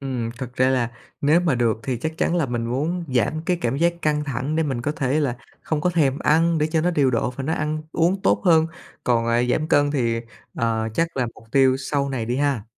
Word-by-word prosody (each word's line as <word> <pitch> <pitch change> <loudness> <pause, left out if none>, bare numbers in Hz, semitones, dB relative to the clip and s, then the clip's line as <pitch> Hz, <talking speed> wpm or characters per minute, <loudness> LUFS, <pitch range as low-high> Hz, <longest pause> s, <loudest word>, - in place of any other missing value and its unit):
Ừm, 125 -4 -3
thực 125 -1 -6
ra 130 +1 +3
là 120 -3 +1 0.3
nếu 150 +5 +4
mà 165 -7 +1
được 115 -2 +1
thì 130 -3 -2
chắc 160 +6 -4
chắn 175 - +1
là 160 -5 +1
mình 120 -1 -2
muốn 160 +8 -2
giảm 125 +7 +1
cái 180 - +2
cảm 120 +3 0
giác 170 +2 +2
căng 150 -1 +1
thẳng 135 +3 -2
để 160 - +2
mình 130 -5 -2
có 150 - -1
thể 140 +2 0
là 125 -4 -1 0.3
không 155 -2 -1
có 180 - +1
thèm 145 -5 +1
ăn 165 +1 +3
để 150 - +2
cho 160 0 0
nó 175 +2 +1
điều 140 -6 +2
độ 120 +1 0
và 130 +2 -6
nó 160 - -1
ăn 155 -1 -2
uống 180 +4 +1
tốt - - +2
hơn. 160 -2 +5 0.4
Còn, 115 -2 +2
à, 120 +1 +2
giảm 155 +4 0
cân 145 0 +3
thì, 115 -5 0 0.3
à, 110 -1 0
chắc 165 -2 -1
là 125 -2 +1
mục - - -16
tiêu 130 -1 +4
sau 140 +1 -1
này 125 -4 -2
đi 120 +2 -1
ha. 140 -7 0
140 Hz, 250 wpm, -23 LUFS, 120-155 Hz, 0.4 s, hơn